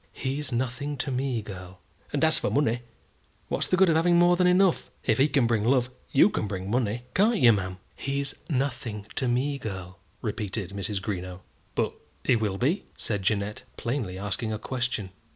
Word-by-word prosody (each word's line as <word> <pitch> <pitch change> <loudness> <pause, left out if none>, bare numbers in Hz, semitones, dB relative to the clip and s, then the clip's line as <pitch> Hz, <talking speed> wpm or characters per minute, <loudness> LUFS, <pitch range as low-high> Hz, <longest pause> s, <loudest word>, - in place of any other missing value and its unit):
"He's 135 +1 -2
nothing 130 +4 -2
to 135 +2 -2
me, 130 -3 -1
girl." 95 -2 -9 0.3
"And 145 +1 +2
as 160 0 +4
for - - 0
money, 120 -4 +1 0.7
what's - - 0
the 185 - +2
good 190 0 +6
of 165 - +4
having 170 +2 +4
more 175 0 +6
than 180 0 +3
enough? 180 0 +3 0.2
If 110 -1 +2
he 135 - +6
can 140 -4 +3
bring 115 -3 +2
love, 125 +1 +2 0.2
you - - +6
can 105 - -1
bring 95 0 -4
money; 120 -1 0
can't 215 +4 +4
you, 120 -9 +7
ma'am?" 95 -2 -2 0.2
"He's 140 0 -1 0.2
nothing 125 -7 -2
to 130 - 0
me, 135 +4 +1
girl," 95 -4 -6 0.2
repeated 105 -3 -3
Mrs. 100 0 -3
Greenow. 90 -3 -4 0.3
"But - - +1 0.3
he - - +4
will 105 -4 0
be?" 150 - +1
said 105 -3 -2
Jeannette, 100 +1 0 0.2
plainly 115 -7 -2
asking 105 +3 -2
a 110 - -1
question. 120 -4 -2
120 Hz, 185 wpm, -27 LUFS, 100-140 Hz, 0.7 s, you